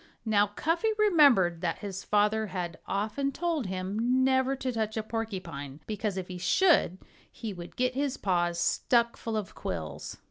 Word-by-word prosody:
Now, 210 -2 +3
Cuffy 330 - 0
remembered 280 - +5
that 170 -3 -1
his 195 -2 -6
father 210 +1 +2
had 180 -3 -4
often 220 +8 -1
told 320 - -1
him 210 +8 0
never 260 0 +2
to 260 -1 -3
touch 220 -2 -2
a 220 - -1
porcupine, 185 -11 -5
because 210 -2 -3
if 185 -1 -4
he 180 -1 -7
should 185 - +3 0.3
he 225 -3 -6
would 175 -1 -9
get 255 0 +1
his 275 0 -1
paws 175 -3 0
stuck 235 -1 +2
full 225 -1 -3
of 210 -3 -4
quills. 80 -4 -5
215 Hz, 165 wpm, -29 LUFS, 185-255 Hz, 0.3 s, remembered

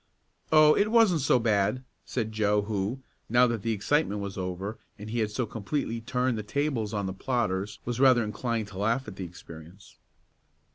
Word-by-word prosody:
"Oh, 155 -1 +7
it 205 +1 +2
wasn't 220 -8 +4
so 130 - +4
bad," 115 +2 +1 0.2
said 110 -3 -3
Joe 105 -1 +1
who, 105 +5 -3 0.3
now 120 +2 +5
that 115 -3 -1
the 115 - -1
excitement 110 +1 0
was 100 -1 -5
over, 95 +3 -4 0.2
and 105 +1 -8
he 120 - -1
had 110 -2 +1
so 110 +4 -2
completely 115 +2 -3
turned 125 0 -1
the - - -2
tables 115 -1 -1
on 100 -2 -2
the 95 - -3
plotters, 105 -3 -2
was 120 0 -3
rather 130 -3 +5
inclined 110 0 -3
to 95 -2 -9
laugh 115 +6 0
at - - -8
the 95 - -5
experience. 85 +2 -13
110 Hz, 185 wpm, -28 LUFS, 100-125 Hz, 0.3 s, Oh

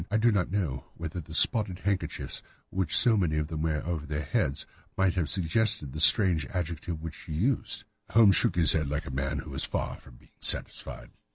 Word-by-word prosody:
I 105 - +1
do 115 +2 +3
not 100 -4 0
know 85 -10 -3
whether 85 +2 -5
the - - -11
spotted 105 -5 +1
handkerchiefs 100 0 -3 0.3
which 95 -4 +4
so 120 -2 +6
many 85 -7 0
of 75 0 -2
them 80 -2 -4
wear 80 -1 -1
over 80 -3 -4
their 75 +1 -3
heads 70 -1 -1 0.3
might 95 -2 +2
have 90 -5 -1
suggested 90 - +1
the 75 - -6
strange 90 -2 +5
adjective 85 -2 -5
which 80 -2 -6
she 80 - -9
used." 115 - -1 0.3
Holmes 105 -3 +5
shook - - +4
his 85 -3 +3
head 75 -3 0
like 75 +2 -3
a 75 - -7
man 70 +2 -2
who - - -7
is - - -3
far - - -3
from 65 - -17
being - - -22
satisfied. - - -1
85 Hz, 205 wpm, -28 LUFS, 75-95 Hz, 0.3 s, so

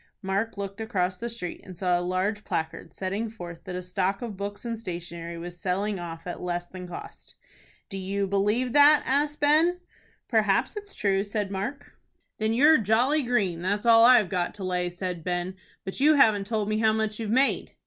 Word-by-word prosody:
Mark 200 +4 -1
looked 200 +1 -5
across 185 -5 -1
the 235 - -3
street, 225 -7 -6
and 185 -3 -11
saw 180 -1 +1
a - - -3
large 185 +4 -1
placard, 160 +1 -4
setting 200 +4 -3
forth 175 -6 -9
that 180 - -5
a 180 - -4
stock 190 +3 -1
of 225 -4 -5
books 205 +3 -6
and 230 -1 -3
stationery 170 -3 -6
was 175 +1 -8
selling 195 +2 -1
off 165 -1 -7
at 175 - -6
less 175 -1 -2
than 180 0 -9
cost. 175 - -10 0.5
"Do 195 - -6
you 195 +1 -1
believe 210 +6 0
that?" 295 +1 +7
asked 290 +2 0
Ben. 320 +5 +4 0.5
"Perhaps 220 - +2
it's 410 -1 -8
true," 195 -1 +1
said 205 -1 -3
Mark. 270 +9 -5 0.4
"Then 220 0 +1
you're 295 +6 +6
jolly 245 +8 +3
green, 205 -10 0
that's 205 +4 -1
all 230 -1 +7
I've 235 -6 +6
got 180 -1 -1
to 200 - -7
lay," 180 -1 -1
said 180 -1 -5
Ben. 180 +1 -2 0.3
"But 190 - -4
you 300 +3 +5
haven't 215 -7 +4
told 215 -2 -1
me 215 0 0
how 220 -1 +3
much 220 0 -1
you've 220 -2 -3
made." 260 +5 +1
200 Hz, 195 wpm, -26 LUFS, 180-230 Hz, 0.5 s, that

